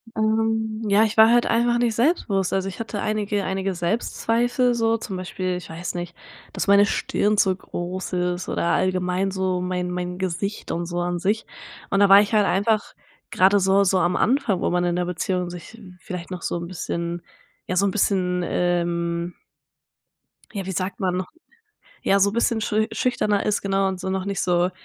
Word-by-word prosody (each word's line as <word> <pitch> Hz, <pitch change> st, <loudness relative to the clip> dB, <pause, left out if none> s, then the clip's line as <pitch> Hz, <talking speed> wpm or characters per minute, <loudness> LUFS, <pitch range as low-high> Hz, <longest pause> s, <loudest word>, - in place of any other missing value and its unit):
Ähm, 220 Hz, 0 st, 0 dB
ja, 205 Hz, +2 st, +4 dB
ich 220 Hz, 0 st, -1 dB
war 220 Hz, +1 st, +8 dB
halt 240 Hz, 0 st, +4 dB
einfach 240 Hz, +1 st, +2 dB
nicht 235 Hz, -2 st, +1 dB
selbstbewusst, 225 Hz, -, +1 dB
also 195 Hz, 0 st, 0 dB
ich 190 Hz, -, -10 dB
hatte 220 Hz, -2 st, -4 dB
einige 210 Hz, -1 st, -1 dB
einige 190 Hz, 0 st, -2 dB
Selbstzweifel 235 Hz, +6 st, 0 dB
so 230 Hz, -1 st, +1 dB
zum 195 Hz, -4 st, -6 dB
Beispiel 185 Hz, 0 st, -3 dB
ich 180 Hz, -, -10 dB
weiß 170 Hz, +2 st, -5 dB
nicht, 175 Hz, -1 st, -5 dB, 0.4 s
dass -, -, -3 dB
meine 200 Hz, +1 st, +6 dB
Stirn 210 Hz, +1 st, 0 dB
zu 190 Hz, -2 st, +3 dB
groß 185 Hz, 0 st, -6 dB
ist 180 Hz, 0 st, -1 dB
oder 170 Hz, -, -1 dB
allgemein 185 Hz, +1 st, 0 dB
so 185 Hz, -1 st, -1 dB
mein 180 Hz, 0 st, -2 dB
mein 180 Hz, 0 st, -4 dB
Gesicht 190 Hz, +2 st, -3 dB
und 170 Hz, +1 st, -2 dB
so 175 Hz, 0 st, -3 dB
an 175 Hz, 0 st, -2 dB
sich. 210 Hz, +5 st, 0 dB, 0.4 s
Und 195 Hz, -, +1 dB
da 200 Hz, -, +6 dB
war 200 Hz, +1 st, +9 dB
ich 210 Hz, +2 st, -2 dB
halt 210 Hz, -2 st, +4 dB
einfach 205 Hz, +3 st, +1 dB, 0.4 s
grade 195 Hz, +2 st, +4 dB
so 195 Hz, +1 st, +3 dB
so 190 Hz, 0 st, +2 dB
am 175 Hz, +1 st, +1 dB
Anfang, 240 Hz, -7 st, +1 dB
wo -, -, +1 dB
man 175 Hz, 0 st, +1 dB
in 175 Hz, 0 st, 0 dB
der 180 Hz, 0 st, 0 dB
Beziehung 180 Hz, 0 st, -2 dB
sich 180 Hz, +6 st, -10 dB, 0.2 s
vielleicht 180 Hz, -2 st, -7 dB
noch 180 Hz, -1 st, -5 dB
so -, -, -2 dB
'n 170 Hz, 0 st, -5 dB
bisschen 170 Hz, -1 st, -4 dB, 0.4 s
ja 185 Hz, -, -3 dB
so 200 Hz, +2 st, +3 dB
'n 195 Hz, -, +1 dB
bisschen 180 Hz, -3 st, +1 dB
ähm 170 Hz, -1 st, -1 dB, 1.2 s
ja, 195 Hz, -3 st, -4 dB
wie 190 Hz, -, -4 dB
sagt 185 Hz, +2 st, -3 dB
man 185 Hz, -2 st, 0 dB
noch 185 Hz, -, -5 dB, 0.7 s
ja, 195 Hz, 0 st, +3 dB
so 200 Hz, +1 st, +3 dB
bisschen 230 Hz, -1 st, +1 dB
schü 215 Hz, +1 st, +1 dB
schüchterner 210 Hz, -5 st, 0 dB
ist 210 Hz, -, 0 dB
genau 195 Hz, 0 st, +1 dB
und 190 Hz, -1 st, -3 dB
so 190 Hz, -, -4 dB
noch 190 Hz, 0 st, -2 dB
nicht 195 Hz, -1 st, -2 dB
so 175 Hz, 0 st, +2 dB
190 Hz, 195 wpm, -23 LUFS, 180-210 Hz, 1.2 s, war